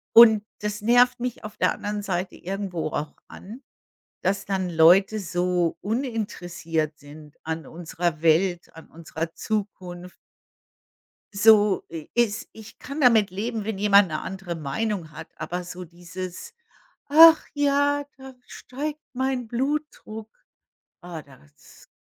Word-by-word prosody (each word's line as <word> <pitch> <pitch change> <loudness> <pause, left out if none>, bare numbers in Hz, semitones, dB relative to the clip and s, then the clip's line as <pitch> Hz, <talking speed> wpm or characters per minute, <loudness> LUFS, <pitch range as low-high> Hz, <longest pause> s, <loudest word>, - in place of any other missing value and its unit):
Und 220 -3 +8 0.2
das 210 0 -3
nervt 245 +3 +4
mich 245 -1 -4
auf 215 0 -9
der - - +2
anderen 205 0 -4
Seite 185 -2 -3
irgendwo 190 -3 -4
auch 150 0 -4
an, 225 +8 -11 0.6
dass 195 +2 0
dann 190 -2 -2
Leute 180 +6 +5
so 175 -2 -1
uninteressiert 180 - -3
sind 150 +1 -14
an 160 -2 -5
unserer 170 -1 -3
Welt, 175 +2 +2
an 160 - -12
unserer 165 0 -6
Zukunft. 180 -4 -5 1.2
So 210 -1 +5
i 160 -2 -8
ist 235 -4 0
ich 220 -1 -13
kann 280 +3 -7
damit 225 -7 +5
leben, 220 +3 -3
wenn 210 -2 -3
jemand 200 -1 +5
'ne 155 -1 -3
andere 190 -2 -6
Meinung 165 +3 -3
hat, 160 +1 -9
aber 180 +1 -4
so 180 +1 -8
dieses, 180 - -8 0.6
„Ach 325 +2 +8
ja“, 285 0 +1
da 265 0 -11
steigt 295 +4 -6
mein 260 -2 -2
Blutdruck. 250 -5 -3 0.7
Ah, 170 -3 -8
das 130 - -20
195 Hz, 130 wpm, -24 LUFS, 170-230 Hz, 1.2 s, Und